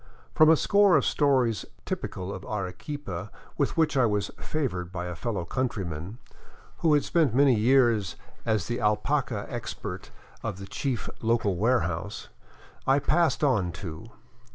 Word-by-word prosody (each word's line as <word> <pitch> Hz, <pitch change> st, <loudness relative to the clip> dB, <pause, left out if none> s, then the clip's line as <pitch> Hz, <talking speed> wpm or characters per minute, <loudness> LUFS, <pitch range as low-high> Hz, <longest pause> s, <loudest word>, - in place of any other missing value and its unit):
From 155 Hz, 0 st, +6 dB
a 160 Hz, -, +8 dB
score 200 Hz, +1 st, +5 dB
of -, -, +1 dB
stories 130 Hz, -6 st, +2 dB, 0.2 s
typical 95 Hz, +2 st, -4 dB
of 95 Hz, -, -7 dB
Arequipa 100 Hz, -, -5 dB, 0.3 s
with -, -, -1 dB
which 160 Hz, -3 st, +2 dB
I 130 Hz, -3 st, +4 dB
was 105 Hz, -2 st, -1 dB
favored 95 Hz, -, -3 dB
by 90 Hz, -1 st, -4 dB
a 90 Hz, -, -4 dB
fellow 100 Hz, -2 st, -3 dB
countryman, 95 Hz, -, -3 dB, 0.6 s
who 160 Hz, -3 st, +3 dB
had 145 Hz, -, +2 dB
spent 155 Hz, -9 st, +2 dB
many 140 Hz, -1 st, +5 dB
years 115 Hz, -4 st, +3 dB, 0.3 s
as 110 Hz, -6 st, 0 dB
the 120 Hz, 0 st, -2 dB
alpaca 110 Hz, +1 st, 0 dB
expert 120 Hz, -2 st, -6 dB, 0.3 s
of 110 Hz, -5 st, -4 dB
the 95 Hz, -, -8 dB
chief 130 Hz, +4 st, -3 dB
local 110 Hz, -4 st, +1 dB
warehouse, 100 Hz, -3 st, -1 dB, 0.6 s
I 135 Hz, +1 st, +5 dB
pass 155 Hz, +3 st, +2 dB
on 105 Hz, -11 st, +2 dB
two. 80 Hz, +2 st, -8 dB
115 Hz, 145 wpm, -27 LUFS, 95-140 Hz, 0.6 s, a